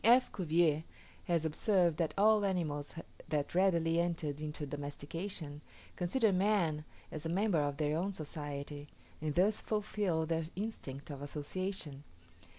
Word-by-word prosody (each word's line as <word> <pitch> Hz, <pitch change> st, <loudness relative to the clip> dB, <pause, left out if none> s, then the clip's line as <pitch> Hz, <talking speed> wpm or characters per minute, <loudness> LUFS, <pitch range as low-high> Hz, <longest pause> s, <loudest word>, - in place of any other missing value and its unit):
F. 245 Hz, +3 st, +6 dB
Cuvier 160 Hz, -3 st, +2 dB, 0.4 s
has 170 Hz, -2 st, +1 dB
observed 170 Hz, 0 st, +3 dB
that 165 Hz, -3 st, 0 dB
all 215 Hz, +1 st, +6 dB
animals 160 Hz, -7 st, -1 dB, 0.3 s
that 150 Hz, -2 st, 0 dB
readily 170 Hz, -3 st, +3 dB
enter 170 Hz, -3 st, 0 dB
into 150 Hz, +1 st, -4 dB
domestication, 145 Hz, +2 st, -5 dB, 0.3 s
consider 210 Hz, +5 st, +2 dB
man 180 Hz, -6 st, +2 dB, 0.3 s
as 155 Hz, -, -5 dB
a 165 Hz, -, -2 dB
member 190 Hz, 0 st, +2 dB
of 145 Hz, -1 st, -1 dB
their 150 Hz, 0 st, +1 dB
own 185 Hz, +5 st, 0 dB
society, 145 Hz, -3 st, -5 dB, 0.3 s
and 155 Hz, -1 st, -1 dB
thus 200 Hz, +4 st, +3 dB
fulfil 205 Hz, -6 st, 0 dB
their 165 Hz, 0 st, 0 dB
instinct 155 Hz, -10 st, -4 dB
of 140 Hz, -1 st, -7 dB
association. 150 Hz, 0 st, -4 dB
165 Hz, 135 wpm, -34 LUFS, 150-190 Hz, 0.4 s, F